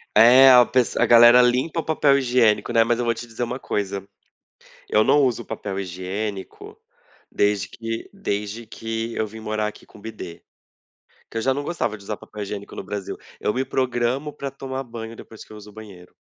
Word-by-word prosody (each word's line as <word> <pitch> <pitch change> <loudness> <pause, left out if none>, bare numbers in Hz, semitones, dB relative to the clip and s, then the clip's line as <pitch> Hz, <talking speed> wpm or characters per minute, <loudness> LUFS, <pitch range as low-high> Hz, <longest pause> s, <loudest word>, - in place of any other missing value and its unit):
É 125 +5 +8
a 125 -1 +8
pes 125 -2 0
a - - +4
galera 120 +1 +8
limpa 125 +7 +1
o - - -2
papel 145 -3 +3
higiênico, 120 -5 +2
né, 115 - +5
mas 120 +1 0
eu 120 - -1
vou 115 - +2
te 120 +1 -9
dizer 115 +1 -5
uma 125 +2 -4
coisa: 100 -1 -3 0.8
eu 110 - +4
não 145 +1 +4
uso 120 -3 0
papel 100 -1 -5
higiênico, 95 +2 -6 0.5
desde 100 -1 0
que 115 0 -6
desde 110 - -4
que 115 +1 -5
eu 110 - 0
vim 110 +2 -11
morar 110 -1 -2
aqui 105 - -10
com - - -17
bidê. 100 -6 -9 0.9
Que 115 - -6
eu - - -1
já 130 +3 +2
não 145 - -4
gostava 145 -9 -2
de 100 - -16
usar 105 - -3
papel 105 -1 -8
higiênico 100 0 -7
no - - -6
Brasil, 100 -2 -6 0.2
eu 105 - -1
me 130 +1 -1
programo 130 +2 -1
para 140 -1 -5
tomar 135 0 -6
banho 115 -2 -8
depois 110 -1 -12
que - - -20
eu 110 - -10
uso 105 0 -12
o 105 - -16
banheiro. 100 -5 -13
115 Hz, 205 wpm, -22 LUFS, 105-125 Hz, 0.9 s, É